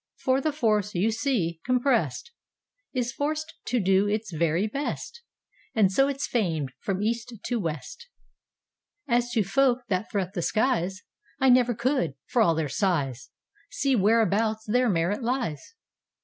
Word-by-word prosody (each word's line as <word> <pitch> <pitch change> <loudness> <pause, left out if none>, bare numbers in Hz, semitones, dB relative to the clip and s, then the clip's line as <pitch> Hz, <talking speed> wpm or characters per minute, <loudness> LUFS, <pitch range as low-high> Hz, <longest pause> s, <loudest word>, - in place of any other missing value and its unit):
For 260 0 +1
the 310 - 0
force, 215 -8 0
you 200 +6 +2
see, 210 - -1
compressed, 250 - 0 0.6
Is 245 -2 -1
forced 310 +5 -3
to 245 - 0
do 195 0 +3
its 210 -2 -2
very 165 +4 +1
best, 280 - -4 0.5
And 205 -4 +4
so 270 +8 +3
it's 280 0 -2
famed 165 - -1
from 195 0 -2
east 235 +2 -1
to 240 -2 -1
west. 190 - -5 1.0
As 240 -1 +2
to 220 - +3
folk 255 +4 +2
that 190 +2 -1
threat 195 -3 -2
the 180 - -2
skies,I 215 +4 -1
never 245 -1 +4
could, 235 - 0
for 245 - +1
all 170 -7 +4
their 160 -1 -1
size, 135 - -1 0.4
See 275 -2 +1
whereabouts 220 +1 +2
their 245 +3 +2
merit 180 +4 0
lies. 240 - -3
220 Hz, 145 wpm, -26 LUFS, 185-255 Hz, 1.0 s, And